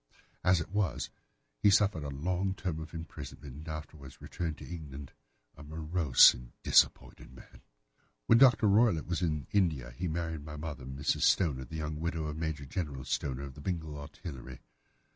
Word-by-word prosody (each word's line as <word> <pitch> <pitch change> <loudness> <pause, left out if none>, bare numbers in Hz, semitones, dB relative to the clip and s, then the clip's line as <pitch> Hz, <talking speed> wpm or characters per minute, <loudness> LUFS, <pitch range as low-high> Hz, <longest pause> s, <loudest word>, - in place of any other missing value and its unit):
As 90 -1 +4
it 80 - -6
was, 90 -12 -1 0.5
he 105 - +6
suffered 100 -5 +3
a 70 - -4
long 90 +7 -1
term 90 -5 -3
of 80 -1 -8
imprisonment 75 -4 -8
and 75 +3 -10
afterwards 75 -3 -8
returned 80 -3 -4
to - - -10
England 75 -5 -8 0.4
a - - -13
morose 80 -1 +5
and - - -12
disappointed - - +2
man. 65 - -15 0.6
"When 115 - +6
Dr. 125 -4 +6
Roylott 105 -5 +4
was 85 0 -2
in 75 -5 -1
India 80 -12 +1
he 90 - -3
married 80 -2 -3
my 75 0 -8
mother, 75 -4 -6
Mrs. 65 +2 -1
Stoner, 70 -8 +3
the 70 - -9
young 75 -1 -3
widow 80 -1 -2
of 75 -1 -4
Major 80 -3 -3
General 70 -4 -4
Stoner, 65 0 -2
of 70 -1 -7
the 75 - -11
Bengal 80 -2 -3
Artillery. 70 -4 -9
80 Hz, 170 wpm, -31 LUFS, 70-85 Hz, 0.6 s, he